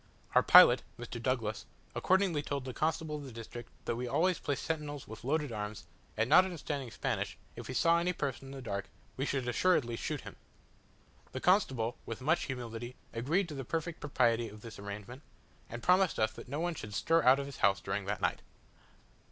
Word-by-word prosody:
Our - - +7
pilot, - - +8 0.2
Mr. 120 0 -6
Douglas, 115 -4 -1 0.3
accordingly 185 -5 +2
told 140 -2 -3
the 130 - -5
constable 155 0 -1
of 145 - -7
the 135 - -8
district 115 +1 -8 0.2
that 120 - -1
we 125 +1 -3
always 165 +7 +2
placed 140 -3 -2
sentinels 150 -3 -3
with 110 +1 -10
loaded 145 +1 0
arms 105 -1 -5 0.3
and 115 +1 +2
not 155 +7 +8
understanding 150 -7 -4
Spanish, - - -2 0.2
if - - -8
we 130 - -5
saw 170 +4 +4
any 175 +1 +1
person 140 -5 -4
in - - -9
the 135 -1 -8
dark, 100 -4 -4 0.3
we 135 +2 -2
should 135 -3 -1
assuredly 120 -2 +2
shoot - - -3
him. - - -10 1.0
The 130 - -3
constable, 130 - +2
with 115 - -5
much 160 +6 +1
humility, 120 -1 -5 0.2
agreed 160 +12 +1
to - - -6
the 135 -2 -4
perfect 165 +5 -3
propriety 120 -5 +1
of 105 0 -12
this 115 -2 -10
arrangement, 105 +6 -7 0.5
and 120 +1 -7
promised 185 0 +4
us 110 0 +2
that 110 - -11
no 145 +3 -3
one 175 +1 0
should 105 -9 -7
stir 165 +8 +3
out 130 -1 +6
of 140 - -3
his 140 -1 -8
house 100 0 +3
during 95 +1 -3
that 100 -1 -3
night. - - 0
130 Hz, 200 wpm, -32 LUFS, 115-155 Hz, 1.0 s, pilot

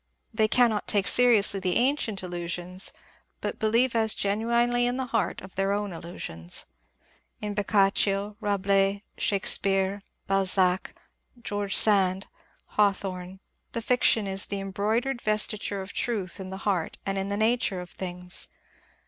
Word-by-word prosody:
They 220 -1 +3
cannot 230 -2 +2
take 200 -2 +3
seri 245 -2 +6
ously 200 -1 +2
the 185 -1 -1
ancient 240 -6 +1
illusions, 175 +1 -1 0.5
but - - -4
believe 230 +3 +2
as 220 -1 +3
genuinely 235 +4 +1
in 245 +1 -1
the 260 - -2
heart 230 -3 -1
of 190 0 -12
their 195 +1 0
own 205 -2 -2
illusions. 90 - -4 0.7
In 210 -1 -4
Boccaccio, 200 0 +1
Rabelais, 200 0 +1 0.2
Shakespeare, 195 0 +1 0.2
Balzac, 190 -1 +1 0.4
George 205 -4 -2
Sand, 195 -2 +4 0.5
Hawthorne, 190 -2 0 0.3
the 230 - -2
fiction 230 -3 +3
is 195 0 -1
the 200 - -3
embroidered 220 +6 -1
vesture 210 -2 0
of 190 - -10
truth 205 -6 -2
in 190 -1 -6
the 190 0 -8
heart 185 -6 -1
and 195 0 -1
in 195 +1 -3
the 200 - -1
nature 220 -3 +1
of 180 0 -9
things. 180 -1 -2
200 Hz, 140 wpm, -27 LUFS, 190-220 Hz, 0.7 s, seri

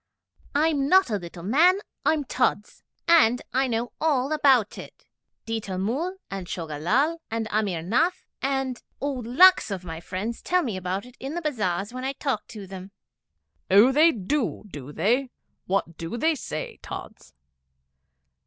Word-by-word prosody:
'I'm 290 -2 +2
not 375 -8 +5
a 210 - +1
little 170 -1 -9
man, 320 - +5 0.3
I'm 310 -2 +2
Tods, 245 -5 -1 0.3
and 300 -8 +5
I 265 +1 +2
know 235 0 -2
all 285 -3 +1
about 265 -8 +3
it. - - -12 0.4
Ditta 220 -4 -3
Mull, 280 - -2
and 195 -2 -5
Choga 160 -5 -5
Lall, 280 - +1
and 225 0 -2
Amir 200 -6 0
Nath, 250 - +1 0.2
and 270 -2 -1 0.2
oh, 285 0 -1
lakhs 260 +8 +5
of 190 -3 -4
my 165 -2 -6
friends 195 +7 -5
tell 360 0 +1
me 225 -7 -3
about 185 +3 -3
it 250 0 -15
in 275 +4 -5
the 345 - -2
bazars 205 - -1
when 255 0 -5
I 270 +1 -1
talk 275 -5 -2
to 210 -4 -9
them.' 190 0 -9 0.8
'Oh, 205 +7 +7
they 310 +5 +6
do 235 - -2
do 145 -2 -8
they? 235 - +1 0.4
What 185 -3 -1
do 165 +7 -4
they 320 +7 +2
say, 155 - -6
Tods?' - - -9
235 Hz, 160 wpm, -25 LUFS, 195-285 Hz, 0.8 s, Oh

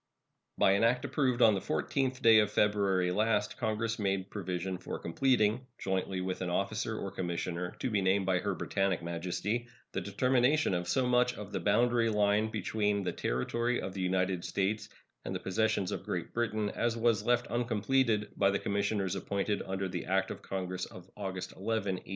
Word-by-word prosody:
By - - +5
an 100 +3 +3
act 125 +2 +3
approved 130 -4 +1
on 110 - +7
the 100 - 0
14th 130 - -1
day 115 -1 +8
of 105 -1 +2
February 100 -4 +2
last 105 +3 +1
Congress 115 -1 -1
made 95 -2 -1
provision 95 -2 -3
for 90 - -5
completing, 120 +4 +1
jointly 95 -1 -2
with 95 0 -3
an 90 - -1
officer 110 +4 -1
or 100 - -4
commissioner 90 -1 -3
to 125 - -2
be 105 -2 +2
named 95 +1 +2
by 90 -1 +2
Her - - -2
Britannic 95 -3 -1
Majesty, 90 +7 -2 0.2
the - - -2
determination 125 +5 +2
of 90 0 -1
so 130 +6 +2
much 125 0 +3
of 105 -1 -8
the - - -2
boundary 115 +2 +3
line 105 0 +2
between 105 -2 0
the 90 - -1
territory 120 - -1
of 95 - -5
the 95 - -4
United 90 -1 0
States 100 +2 -1 0.3
and - - -4
the - - -2
possessions 105 -1 0
of - - -3
Great - - -4
Britain 110 -3 -1
as 120 0 -1
was 115 -3 +2
left 120 +1 +2
uncompleted 115 -1 +1
by 100 - +3
the 100 - +1
commissioners 100 -2 -1
appointed 100 +1 -1
under 95 0 -2
the 90 -2 -4
act 95 +2 +1
of - - -7
Congress 95 -1 -3
of 90 +1 -13
August 95 -2 -5
11, - - -17
1856. 100 -3 -2
100 Hz, 185 wpm, -31 LUFS, 95-115 Hz, 0.3 s, day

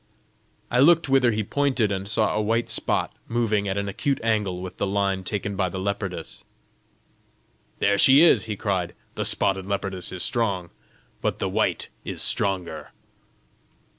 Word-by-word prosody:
I 120 - +2
looked 160 +2 +5
whither 135 -2 +4
he 110 0 -1
pointed, 130 -3 0
and 95 0 -3
saw 110 +1 +1
a 105 - 0
white 115 +2 0
spot - - 0
moving 110 -3 0
at 95 0 -2
an 100 0 -2
acute 135 +8 -1
angle 105 -5 0
with 90 0 -8
the - - -1
line 100 -1 0
taken 100 +1 -3
by 95 -2 0
the 95 - -6
leopardess. 95 -3 -4 1.3
"There 100 0 +2
she 140 +7 +7
is!" 170 - +5
he 110 -2 -3
cried. 95 -4 -2 0.2
"The - - -3
spotted 95 -1 +1
leopardess 100 -2 -3
is 90 - -4
strong, 100 -8 -1 0.5
but - - -1
the - - -2
white - - 0
is - - -3
stronger!" 90 -6 -1
100 Hz, 160 wpm, -24 LUFS, 95-115 Hz, 1.3 s, she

